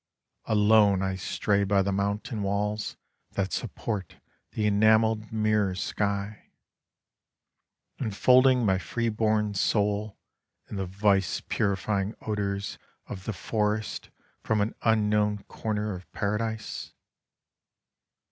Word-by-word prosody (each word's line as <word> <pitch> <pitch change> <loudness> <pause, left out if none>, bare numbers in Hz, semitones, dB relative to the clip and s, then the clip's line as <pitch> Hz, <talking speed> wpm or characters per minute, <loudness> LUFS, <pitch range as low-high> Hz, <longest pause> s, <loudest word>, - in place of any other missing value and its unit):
— - - -49
Alone 105 -2 +5
I 95 0 0
stray 100 +2 0
by 100 0 +3
the 100 - -1
mountain 100 +4 -2
walls 105 +2 -2 0.4
that 95 -1 -1
support 100 -6 -4 0.4
the 105 - -1
enamelled 110 +1 +3
mirror 110 -3 +1
sky, 100 +2 -3 1.5
Enfolding 125 +3 +4
my 95 -2 +3
free 115 +3 -2
born 110 -1 +1
soul 105 +1 0 0.5
in 105 - -6
the 95 -1 -2
vice 100 0 +1
purifying 100 +1 -1
odours 100 -2 -3 0.3
of 95 -1 -8
the 110 - -2
forest 105 +1 -2 0.3
from 110 -1 0
an 105 +2 0
unknown 105 -2 +2
comer 105 -1 -2
of 90 -1 -10
Paradise. 110 +2 -3
105 Hz, 110 wpm, -27 LUFS, 100-110 Hz, 1.5 s, Alone